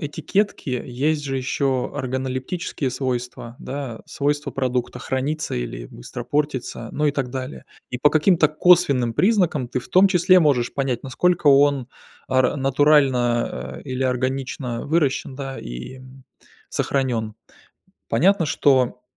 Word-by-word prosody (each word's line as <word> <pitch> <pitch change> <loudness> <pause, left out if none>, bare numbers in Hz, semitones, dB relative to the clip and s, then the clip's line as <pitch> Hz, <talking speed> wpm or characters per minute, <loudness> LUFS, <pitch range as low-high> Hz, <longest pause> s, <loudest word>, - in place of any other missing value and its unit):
этикетки 180 +2 -2
есть 145 +5 -1
же 135 -2 -3
ещё 130 0 0
органолептические 130 +2 -3
свойства, 125 -2 -4
да, 135 -5 -6
свойства 145 0 -2
продукта 125 -2 -2
храниться 140 +5 -2
или - - -5
быстро 120 - -9
портиться, 145 -1 -2
ну 150 0 0
и 145 - +2
так 135 -3 -2
далее. 130 +1 -6 0.3
И 125 - -4
по 145 - +4
каким-то 155 0 +4
косвенным 155 -7 +3
признакам, 180 - +2
ты 125 - -2
в - - -10
том 190 +2 +6
числе 185 0 +5
можешь 135 -6 +1
понять, 135 -3 -2
насколько 165 +5 0
он 140 -2 +5 0.4
ар 130 +2 +2
натурально, 130 - +2
а, - - -11
или 130 0 -3
органично 130 -1 -2
выращен, 145 -4 0
да, 135 -1 -5
и, - - -8
м, 130 0 -15 0.4
сохранён. 120 -6 -1 0.7
Понятно, 175 - +3
что 130 -4 +2
135 Hz, 130 wpm, -22 LUFS, 125-150 Hz, 0.7 s, том